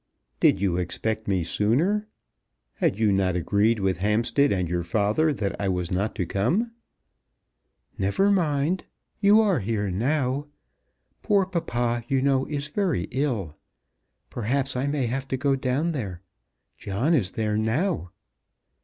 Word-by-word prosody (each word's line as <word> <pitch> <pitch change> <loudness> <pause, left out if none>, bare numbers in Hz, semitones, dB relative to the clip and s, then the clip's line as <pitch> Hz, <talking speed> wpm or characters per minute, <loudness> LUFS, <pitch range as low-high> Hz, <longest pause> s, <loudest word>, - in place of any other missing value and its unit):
"Did - - +4
you 95 -3 +1
expect 110 +5 -2
me 95 -3 +1
sooner? 160 - +1 0.7
Had - - +1
you 110 -2 +3
not 95 -2 +1
agreed 105 +6 +2
with 95 -2 0
Hampstead 115 +8 +2
and 90 -3 0
your 85 +1 -1
father 105 - +1
that 105 -8 -2
I 100 - 0
was 90 -2 -2
not 100 +4 -1
to 90 - -1
come?" 165 - 0 1.3
"Never 100 - +2
mind. 165 -2 +1 0.3
You 210 +2 +6
are 200 -6 +2
here 105 -1 -1
now. 135 +6 0 0.7
Poor 200 -3 +3
papa, 120 -10 -1
you 135 +1 +1
know, 135 0 +2
is 145 -1 -2
very 170 - -1
ill. 120 - -1 0.8
Perhaps 130 +4 -1
I 130 +3 -1
may 140 -3 0
have 130 +3 -3
to 130 - -2
go 135 +1 +1
down 135 +5 0
there. 100 - -5 0.6
John 110 - 0
is 115 - +2
there 105 -1 -1
now." 110 - 0
120 Hz, 145 wpm, -25 LUFS, 100-145 Hz, 1.3 s, You